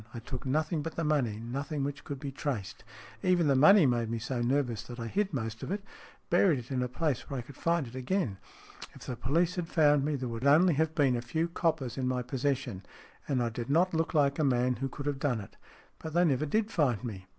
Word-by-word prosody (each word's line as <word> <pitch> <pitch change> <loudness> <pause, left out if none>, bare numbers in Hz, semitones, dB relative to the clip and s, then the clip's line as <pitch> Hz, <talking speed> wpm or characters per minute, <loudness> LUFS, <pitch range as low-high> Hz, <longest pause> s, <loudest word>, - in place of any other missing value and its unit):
I - - -4
took 125 +2 -6
nothing 155 +3 0
but 165 +2 -5
the 165 - -2
money, 135 -9 +1
nothing 140 +5 -3
which 140 0 -4
could 140 -2 -6
be 140 -1 -5
traced. 130 -7 -4 0.4
Even 180 -2 +3
the 140 -2 +3
money 180 +6 +7
made 120 -3 +1
me 115 - -2
so 120 +2 -3
nervous 120 -3 0
that 120 0 -9
I 115 - -4
hid 195 - -1
most 115 -6 -4
of - - -5
it 200 0 -2 0.5
buried 175 -3 +4
it 125 +1 -8
in 130 -1 0
a 125 - 0
place 140 +1 -2
where 140 - -3
I 120 - -4
could 135 +3 -13
find 170 -1 0
it 115 - -11
again. 130 - -1 0.6
If - - -11
the 125 - -4
police 165 +9 0
had 175 -2 -2
found 150 -4 +4
me, 150 +1 0
there 130 -2 -3
would 115 0 -5
only 165 +5 +6
have 160 +2 0
been 140 -6 +3
a 120 - -2
few 160 +8 -1
coppers 160 -7 -1
in 130 - 0
my 125 -1 0
possession, 130 -5 -2 0.4
and 130 -4 +1
I 120 - 0
did 115 +2 -6
not 170 +5 +3
look 160 0 -1
like 140 -1 +3
a - - +3
man 125 -2 +2
who 135 0 -2
could 140 +2 -7
have 145 -2 -1
done 135 -5 0
it. 100 - -10 0.4
But 160 0 -7
they 175 +1 +5
never 150 -1 +1
did 220 +8 0
find 130 - +1
me." 100 -6 -6
140 Hz, 245 wpm, -30 LUFS, 125-160 Hz, 0.6 s, money